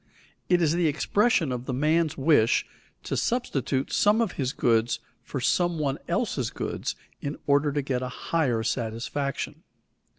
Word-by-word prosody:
_ - - -40 0.5
It 175 -1 +4
is 155 -1 +3
the 170 -1 +2
expression 165 - +2
of 125 0 -4
the 130 - -2
man's 155 +3 +2
wish 135 -6 +3 0.4
to - - -3
substitute 140 - -1
some 210 +2 +4
of 225 -5 +1
his 135 -5 -2
goods 115 -1 +2 0.2
for 135 - -5
some 175 +6 +1
one 140 -3 -1
else's - - 0
goods - - -4 0.3
in 140 +1 -4
order 145 +1 +3
to 145 0 -1
get 130 -2 -1
a 125 - -3
higher 125 -4 0
satisfaction. 120 +4 -3
140 Hz, 160 wpm, -26 LUFS, 125-165 Hz, 0.5 s, It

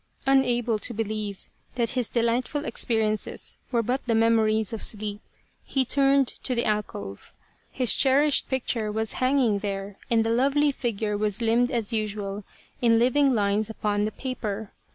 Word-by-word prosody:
Unable 245 -4 +2
to 235 - -4
believe 210 -2 -4 0.3
that 235 -2 +1
his 250 -4 -1
delightful 245 +5 0
experiences 220 -2 -1
were 235 -2 +1
but 250 +4 -1
the 230 - +2
memories 220 -1 +2
of 225 - -4
sleep 210 -1 -2 0.4
he 265 -1 0
turned 275 +1 +3
to 255 - -4
the 235 - 0
alcove. 100 - -4 0.3
His 250 -3 +3
cherished 280 +2 +3
picture 235 -4 -1
was 220 0 -1
hanging 255 -5 +2
there 195 -1 -5
and 230 -1 +3
the 225 - 0
lovely 280 +5 +3
figure 220 -5 -2
was 210 0 -1
limned 235 +1 +2
as 235 -3 -2
usual 205 -2 -3 0.4
in 230 -2 +4
living 255 +3 +3
lines 205 0 +1
upon 210 -1 -1
the 215 - -2
paper. 220 -5 -5
230 Hz, 155 wpm, -25 LUFS, 210-255 Hz, 0.4 s, in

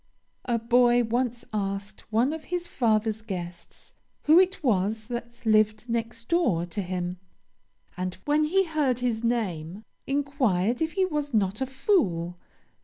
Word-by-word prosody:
"A 240 -2 +1
boy 240 +1 +4
once 240 +1 -1
asked 200 +1 -4
one 240 +7 +2
of 320 -1 -7
his 355 -1 -3
father's 220 -6 +1
guests 175 -5 -7 0.3
who 315 +4 +7
it 375 -2 +2
was 215 -2 +1
that 240 0 -7
lived 215 +1 +3
next 230 0 -3
door 305 - +2
to 175 +4 -4
him, 180 -1 -3 0.8
and 185 0 -3
when 300 +1 +3
he 385 +5 +2
heard 300 -7 +1
his 240 -2 -1
name, 200 -6 -2 0.2
inquired 260 - +1
if 320 0 0
he 380 -1 +2
was 295 -7 -2
not 200 +2 +1
a 265 - 0
fool. 180 - 0
235 Hz, 145 wpm, -27 LUFS, 200-275 Hz, 0.8 s, who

